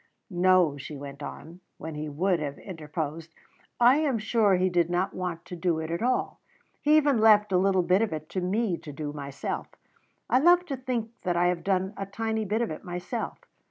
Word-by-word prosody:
"No," 180 -5 +3
she 150 +2 -7
went 140 0 -9
on, 165 +4 -8 0.2
when 160 0 -7
he 150 0 -4
would 175 +4 +1
have 145 -2 -4
interposed; 160 -2 -6 0.4
"I 245 +3 +6
am 295 -6 +1
sure 215 -2 +2
He 185 +1 +2
did 175 -2 +1
not 180 +2 0
want 180 -2 -4
to 180 - -7
do 170 -1 0
it 160 +3 -3
all. 250 +2 0 0.4
He 300 +1 +5
even 285 -5 +3
left 210 -2 +5
a 185 - +4
little 190 -1 +3
bit 180 +4 +3
of 225 - 0
it 155 -1 -5
to 185 - -2
me 190 0 0
to 150 - -9
do 145 +1 -5
myself. 140 -2 -5 0.6
I 255 - +4
love 350 +4 +5
to 285 -6 -3
think 245 -3 -3
that 175 -2 -1
I 175 +1 +3
have 180 -1 -2
done 190 0 0
a 195 -1 -4
tiny 220 +2 -2
bit 215 +4 0
of 230 - -3
it 155 - -7
myself. 180 +6 -4
185 Hz, 205 wpm, -27 LUFS, 160-220 Hz, 0.6 s, I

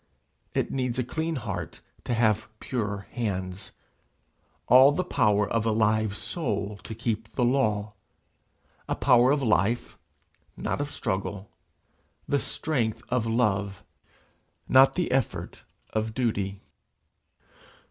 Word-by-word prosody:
It - - 0
needs 125 -2 -1
a 125 - +1
clean 160 +6 -2
heart 100 - -5 0.2
to 120 - 0
have 110 -2 +2
pure 105 -5 -3
hands, 95 -5 -3 0.9
all 130 +3 +8
the 185 +5 0
power 105 - +2
of 115 -2 0
a 115 - +1
live 110 -1 +1
soul 105 - -3
to 110 - -8
keep 115 -1 -3
the 125 - +1
law 110 -5 +1 1.0
a - - +1
power 125 -1 +5
of 140 0 +2
life, 110 +1 +1 0.6
not - - -2
of 145 - -3
struggle; 95 -3 -3 0.8
the 140 - +2
strength 125 -10 -1
of 125 -3 0
love, 100 -4 0 0.8
not 135 +1 +6
the 180 -7 -1
effort 130 -2 -2 0.3
of 110 0 -2
duty. 100 -6 -1
110 Hz, 120 wpm, -27 LUFS, 105-125 Hz, 1.0 s, all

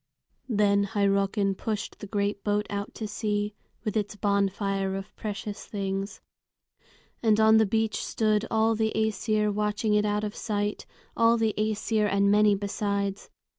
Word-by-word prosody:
Then 200 -2 +3
Hyrrockin 200 -1 +1
pushed 210 +1 -4
the 205 - -7
great 200 0 -1
boat 210 0 +1
out 200 0 -4
to 220 - -4
sea, 210 0 -2 0.3
with 215 -2 -3
its 210 -1 -1
bonfire 195 -1 0
of 195 0 -7
precious 210 -1 -5
things. 195 -1 -3 1.0
And 220 -2 +3
on 220 0 +6
the 220 -1 +4
beach 220 0 0
stood 215 -1 +1
all 225 0 +3
the 220 0 0
Æsir 215 -1 +1
watching 210 +1 0
it 210 0 +3
out 210 0 0
of 210 -1 -4
sight, 205 -1 -2 0.3
all 230 0 +4
the 220 -2 +1
Æsir 215 0 0
and 200 0 +3
many 210 0 +5
besides. 200 0 -2
210 Hz, 150 wpm, -27 LUFS, 200-215 Hz, 1.0 s, on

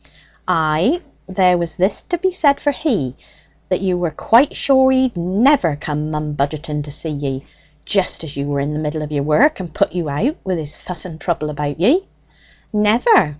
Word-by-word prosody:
"Ay, 160 - +2 0.3
there 185 -1 +3
was 165 -3 -2
this 190 +3 +1
to 350 - -3
be 375 +2 0
said 285 -6 +3
for 290 - +1
he, 215 - -1 0.5
that 185 - 0
you 185 -2 +1
were 175 -2 0
quite 230 - +3
sure 265 -1 +4
he'd 260 -3 +2
never 185 - +2
come 150 +1 -4
mumbudgeting 150 0 -3
to 145 - -9
see 155 +2 -1
ye, 140 -2 -4 0.4
just 195 -4 0
as 150 -2 -8
you 140 0 -3
were 145 -1 -1
in 145 +2 -2
the 150 - -3
middle 155 0 -3
of 150 - -7
your 145 -2 -1
work, 215 - +3
and 175 -4 -8
put - - +1
you 170 -4 -2
out 220 - -1
with 185 -2 -2
his 150 -2 -4
fuss 180 0 -6
and 160 -3 -9
trouble 155 -4 -2
about 145 0 -4
ye." 295 - +3 0.7
"Never. 210 - +4
170 Hz, 195 wpm, -18 LUFS, 150-230 Hz, 0.7 s, sure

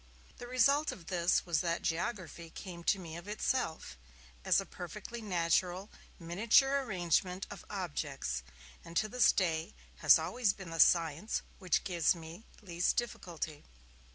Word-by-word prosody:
The 245 - -7
result 275 +5 +3
of 170 - -11
this 170 0 +2
was 170 -3 +1
that 170 -1 -1
geography 170 -1 -3
came 170 0 -9
to 200 - +3
me 165 -4 -8
of 175 - -10
itself, 165 - -2 0.4
as - - +4
a - - -4
perfectly 210 +7 -8
natural 180 0 0 0.3
miniature 230 +11 +3
arrangement 180 - 0
of 200 - -9
objects, 150 - -3 0.4
and 165 0 -5
to 215 - +2
this 245 +2 +4
day 160 - -1 0.2
has - - +7
always 240 -5 0
been 190 -4 -9
the 165 - -5
science 165 +5 +3 0.2
which 185 -3 +1
gives 175 -2 +2
me 165 +5 -10 0.2
least 175 -2 0
difficulty. 170 -10 -4
180 Hz, 145 wpm, -33 LUFS, 165-210 Hz, 0.4 s, has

